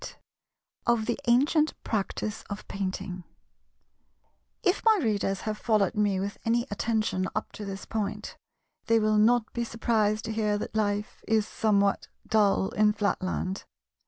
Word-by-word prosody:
§ - - -5
8 - - -13 0.7
Of 235 -2 +3
the 240 - -1
Ancient 295 +6 +3
Practice 215 0 -2
of 200 0 -6
Painting 185 -2 -4 1.4
If 370 -1 +2
my 445 -1 +6
Readers 205 - 0
have 215 -1 -3
followed 215 -5 +2
me 205 -2 +1
with 200 +2 -4
any 235 +1 +1
attention 215 -3 0
up 215 - -2
to 210 - -7
this 195 0 -6
point, 215 -1 -3 0.5
they 230 - +4
will 215 -1 +3
not 230 +1 +3
be 235 - -1
surprised 220 -2 0
to 225 - -3
hear 210 -1 +1
that - - -5
life 205 -1 -1
is 220 -1 +2
somewhat 200 -3 +1 0.2
dull 205 -3 +3
in 210 0 +3
Flatland. 190 -2 -2
215 Hz, 150 wpm, -28 LUFS, 200-225 Hz, 1.4 s, my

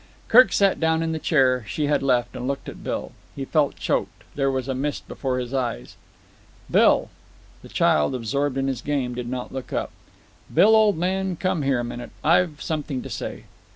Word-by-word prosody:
Kirk 245 -3 +7
sat 195 -1 +3
down 160 0 +2
in 165 - -1
the 160 - -2
chair 130 -6 +2
she 145 +10 -2
had 145 -1 +1
left 125 -3 +1
and 125 - -4
looked 140 0 -3
at - - -9
Bill. - - -3 0.2
He 135 - -4
felt 150 -1 +1
choked. - - -2
There 135 -1 +1
was 130 -1 -2
a 135 - -1
mist 140 +3 -3
before 130 -2 -3
his 125 0 -4
eyes. 125 - -3 0.8
"Bill." - - +4 0.5
The - - -13
child, 75 - +2
absorbed 135 +3 -1
in 135 - 0
his 130 -3 -2
game, 135 -4 -1
did 120 0 -5
not 125 0 -5
look 130 -1 -6
up. - - -2 0.6
"Bill, 220 +2 +6
old 215 -4 +4
man, 190 +2 -1
come 180 -1 -1
here 135 -3 +1
a - - -2
minute. 120 0 -6
I've 170 -2 +2
something 150 -5 -3
to - - -8
say." - - -5
140 Hz, 195 wpm, -24 LUFS, 125-160 Hz, 0.8 s, Kirk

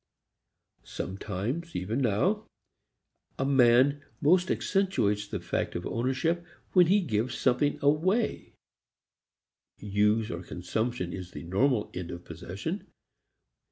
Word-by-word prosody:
Sometimes, 105 - -4
even 110 +9 -1
now, 180 - +1 0.9
a 135 - 0
man 135 +1 +4 0.2
most 180 +4 +4
accentuates 105 - +1
the - - -4
fact - - -2
of 85 - -3
ownership 130 +9 0 0.3
when 180 -2 +6
he 200 +4 +4
gives 120 - -1
something 140 +3 +2
away; 185 +11 +1 1.2
use, 105 +2 +1 0.2
consumption, 90 +1 -2
is 90 -2 -6
the - - -7
normal 105 +6 +1
end 90 -1 -5
of 85 0 -8
possession. 95 - -5
125 Hz, 105 wpm, -29 LUFS, 100-160 Hz, 1.2 s, when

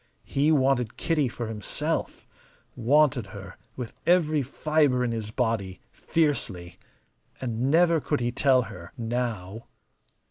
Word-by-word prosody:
He 145 +3 +2
wanted 130 -5 +2
Kitty 155 -5 +1
for 120 0 -5
himself, 110 -3 -3 0.5
wanted 135 -2 +3
her 100 -1 -10 0.2
with 125 -3 -6
every 160 -4 +4
fibre 140 -1 +1
in 120 - 0
his 110 -2 -4
body, 110 -5 -1
fiercely. 95 - -1 0.6
And 125 +1 -1
never 165 +1 +4
could 150 - -1
he 120 0 -1
tell 130 0 +3
her 90 -5 -10
now. 115 -3 -3
125 Hz, 120 wpm, -26 LUFS, 110-145 Hz, 0.6 s, every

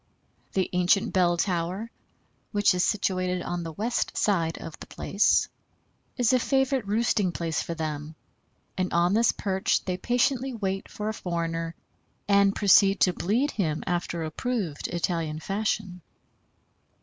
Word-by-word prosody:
The 190 -1 +1
ancient 185 +5 +2
bell 175 -2 +3
tower, 185 +5 -1 0.6
which 205 -2 +3
is 180 0 +1
situated 185 -3 0
on 175 0 -3
the 165 -1 -5
west 220 +9 -2
side 165 -6 +1
of 160 - -9
the - - -10
place, 200 - +2 0.7
is 245 -1 +3
a 255 - +4
favorite 265 -3 +1
roosting 210 -3 +1
place 165 -2 -2
for 170 - -4
them, 155 -1 -4 0.6
and 185 -1 -1
on 175 +2 +3
this 230 +2 +4
perch 190 -1 0
they 180 -1 -2
patiently 250 +4 0
wait 195 -3 -3
for 210 - -5
a 220 - -1
foreigner, 165 -3 -3 0.5
and 200 -1 +4
proceed 200 0 +5
to 180 - +4
bleed 235 - 0
him 160 -7 -1
after 170 -1 -2
approved 175 - -3
Italian 165 -3 -2
fashion. 195 0 -2
185 Hz, 140 wpm, -26 LUFS, 170-215 Hz, 0.7 s, proceed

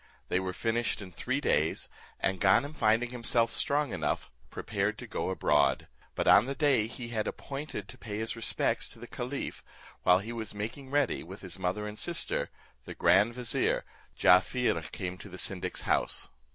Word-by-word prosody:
They 90 - +2
were 95 -1 -2
finished 115 +4 -1
in 95 -3 -8
three 130 - -2
days, 80 - +1 0.3
and 95 -1 -1
Ganem 140 +10 +4
finding 115 -2 +2
himself 120 -1 +2
strong 145 -2 +1
enough, 80 -5 -2 0.2
prepared - - -2
to - - -8
go - - -3
abroad; 75 -1 +2 0.3
but - - -1
on 105 - +7
the 140 - -2
day 135 -8 +3
he 120 +1 -7
had 110 -2 -1
appointed 135 -7 -5
to 100 - -13
pay 105 -2 -5
his 110 +1 -1
respects 115 - 0
to - - -10
the - - -8
caliph, - - -5 0.4
while 90 0 +6
he 110 +5 -5
was 110 -3 -5
making 115 +6 -5
ready, 145 -2 +1
with 95 +4 -10
his 95 -1 -6
mother 95 +3 -1
and 105 0 -6
sister, 170 -1 0 0.4
the - - -7
grand 115 +4 +4
vizier, 125 -2 0 0.3
Jaaffier 95 +7 +4
came 90 -2 -5
to 100 - -10
the 90 - -9
syndic's 90 0 -1
house. - - +1
110 Hz, 180 wpm, -30 LUFS, 95-125 Hz, 0.4 s, on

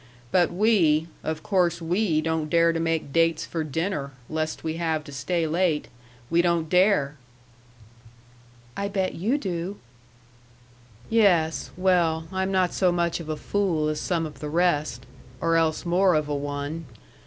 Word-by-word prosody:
But 180 -2 +3
we 175 -6 +3 0.2
of 155 0 -3
course 180 -4 +1
we 170 -1 +1
don't 160 -1 -1
dare 170 +1 +4
to 165 - -1
make 165 -4 -1
dates 165 -1 +2
for 165 -2 -3
dinner, 155 -2 -3 0.2
lest 155 0 -3
we 160 0 -3
have 160 -2 -1
to 145 - -11
stay 165 +5 -1
late. 160 -1 0 0.4
We 170 +1 +4
don't 170 -2 +1
dare!" 180 -6 +3 1.6
"I 200 - -2
bet 195 -2 -1
you 220 - 0
do!" 185 -4 -4 1.3
"Yes 180 -8 +2
well, 170 -3 +2
I'm 190 0 -1
not 185 -2 +1
so 185 -2 +2
much 170 -1 0
of 160 -2 -8
a 155 - -2
fool 170 -7 0
as 155 0 -2
some 170 -3 -1
of 150 -3 -9
the 150 +1 -5
rest 150 -6 0 0.3
or 165 0 +1
else 165 +1 +1
more 180 +1 +3
of 155 -1 0
a 145 - -2
one. 145 +2 -4
165 Hz, 155 wpm, -25 LUFS, 155-180 Hz, 1.6 s, dare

